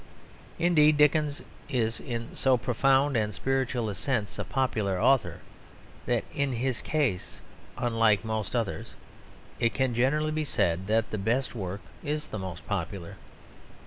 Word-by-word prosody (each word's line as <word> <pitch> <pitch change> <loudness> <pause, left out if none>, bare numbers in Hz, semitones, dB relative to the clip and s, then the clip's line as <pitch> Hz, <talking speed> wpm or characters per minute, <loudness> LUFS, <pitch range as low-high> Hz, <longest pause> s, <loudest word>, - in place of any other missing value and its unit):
Indeed, 155 -3 +4
Dickens 150 0 +3 0.3
is 115 -3 0
in 115 -2 -5
so 130 -1 +3
profound 135 +3 +2
and 105 -3 0
spiritual 130 -3 0
a 105 - -2
sense 110 0 -2
a - - 0
popular 110 -8 0
author 135 +2 +2 0.7
that - - +1
in 140 -2 0
his 125 +1 -1
case, 140 -13 -1 0.4
unlike 115 -4 +2
most 110 0 -2
others, 115 -5 -2 0.6
it 115 - +1
can 130 -2 +1
generally 145 +6 +2
be 155 0 -1
said 95 - 0
that 110 +1 +1
the 110 - -2
best 120 +6 0
work 100 -3 -4 0.2
is 150 +1 -3
the 110 - -4
most 95 -2 -6
popular. 95 -2 -4
120 Hz, 145 wpm, -28 LUFS, 105-135 Hz, 0.7 s, Indeed